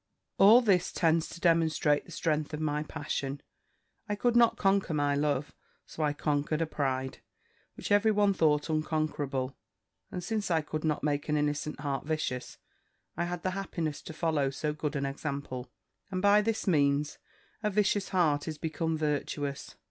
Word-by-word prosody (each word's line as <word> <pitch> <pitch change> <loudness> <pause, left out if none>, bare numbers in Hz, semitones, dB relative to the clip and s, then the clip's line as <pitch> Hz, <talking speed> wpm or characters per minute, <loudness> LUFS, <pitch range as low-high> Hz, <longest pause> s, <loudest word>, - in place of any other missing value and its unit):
"All 215 +5 +8
this 190 -6 +2
tends 165 -1 +2
to - - -9
demonstrate 160 -3 +2
the - - -14
strength 155 -2 -1
of - - -6
my 150 -1 0
passion: 145 -2 -4 0.7
I 205 - 0
could 240 +3 +1
not 235 -1 +5
conquer 195 -4 +2
my 145 -1 +2
love; 145 0 0 0.3
so - - -7
I 150 -1 +2
conquered 150 +1 -1
a 165 - +1
pride, 130 -4 -2 0.6
which - - -6
every 205 +2 +5
one 205 -2 +3
thought 150 -4 +2
unconquerable; 155 -4 -1 0.5
and 180 - -5
since 210 +1 -2
I 165 -2 +2
could 155 +1 -5
not 155 -3 0
make 145 0 -1
an 150 - +2
innocent 145 0 -1
heart 140 -3 -2
vicious, 155 -5 -3 0.6
I 170 - -1
had 175 0 -4
the 185 - 0
happiness 170 -6 -3
to - - -9
follow 155 -4 0
so 150 +3 -2
good 150 0 -3
an 140 -1 -1
example; 140 -2 -4 0.4
and 185 -2 -2
by 205 +2 +5
this 220 +1 -1
means, 145 -4 +2 0.4
a 210 - +1
vicious 205 -1 +1
heart 155 -6 +2
is 155 -1 -4
become 160 +1 -2
virtuous. 145 -2 -2
155 Hz, 170 wpm, -30 LUFS, 145-180 Hz, 0.7 s, All